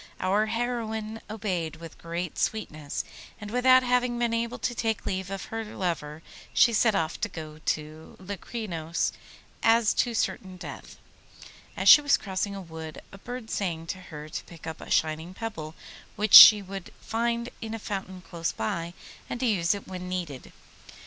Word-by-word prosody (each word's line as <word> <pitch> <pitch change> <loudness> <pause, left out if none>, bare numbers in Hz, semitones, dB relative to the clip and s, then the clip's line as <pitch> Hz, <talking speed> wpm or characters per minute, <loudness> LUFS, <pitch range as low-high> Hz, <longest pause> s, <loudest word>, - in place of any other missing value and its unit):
Our 200 +4 +2
heroine 225 -2 -3
obeyed 185 -7 -3
with 165 0 -11
great 170 0 -4
sweetness, 155 -9 -2 0.4
and 210 -1 -7
without 255 +1 +5
having 250 -1 +1
been 235 -1 0
able 235 +1 -1
to 245 - -2
take 225 -2 -2
leave 190 -1 -3
of 195 -1 -5
her 225 0 -2
lover 165 -7 -4 0.3
she 235 - +6
set 220 -1 +3
off 165 -3 -1
to 225 - 0
go 155 -3 -8
to 155 +1 -4
Locrinos 185 -4 -3 0.5
as 225 -1 +4
to 240 -2 0
certain 190 -2 -2
death. 180 - -9 0.8
As - - -1
she 295 - +11
was 285 -1 +4
crossing 200 0 -3
a 195 - -6
wood 160 -2 -9
a 195 - -12
bird 245 0 -7
sang 170 -5 -2
to 185 - -13
her 155 -4 -9
to 155 - -6
pick 165 -3 -13
up 160 -1 -6
a - - -10
shining 160 +3 0
pebble 165 -9 -6 0.4
which 210 -1 -1
she 210 -2 +12
would 195 -1 -8
find 235 +1 -1
in 225 0 -4
a - - -4
fountain 190 -3 -5
close 165 -2 -2
by, 170 +10 -3 0.3
and 240 - -4
to - - +1
use 195 -5 +2
it 200 - -9
when 180 -1 -6
needed. 170 -8 -5
195 Hz, 170 wpm, -27 LUFS, 165-225 Hz, 0.8 s, she